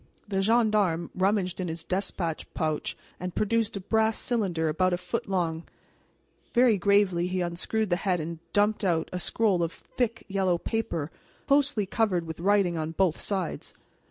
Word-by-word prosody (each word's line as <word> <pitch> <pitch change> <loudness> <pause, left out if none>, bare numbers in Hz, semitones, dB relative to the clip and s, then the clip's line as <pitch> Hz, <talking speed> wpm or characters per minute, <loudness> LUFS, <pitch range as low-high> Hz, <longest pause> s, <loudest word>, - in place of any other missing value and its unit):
The 195 -2 0
gendarme 210 -6 +2
rummaged 190 -1 +1
in 185 - -2
his 165 0 -5
despatch 180 -3 -2
pouch 155 -2 -1 0.2
and 180 0 -5
produced 220 0 +1
a - - -3
brass 220 +3 +1
cylinder 190 -9 0
about 185 +4 +1
a - - +1
foot 180 +2 -4
long. 170 -4 0 0.9
Very 240 -2 +6
gravely 190 -2 +3
he 185 0 -1
unscrewed 180 +4 -1
the 175 - +3
head 185 -2 0
and 160 +1 -5
dumped 210 +1 +2
out 165 -4 +1
a 180 - -2
scroll 195 +1 +1
of 165 -1 0
thick 230 +3 -3
yellow 190 -3 +1
paper 170 -7 -2 0.3
closely 280 -7 +3
covered 190 -4 0
with 160 0 -7
writing 190 -2 +2
on 160 +1 -3
both 180 -3 +2
sides. 190 -5 -3
185 Hz, 160 wpm, -27 LUFS, 170-210 Hz, 0.9 s, Very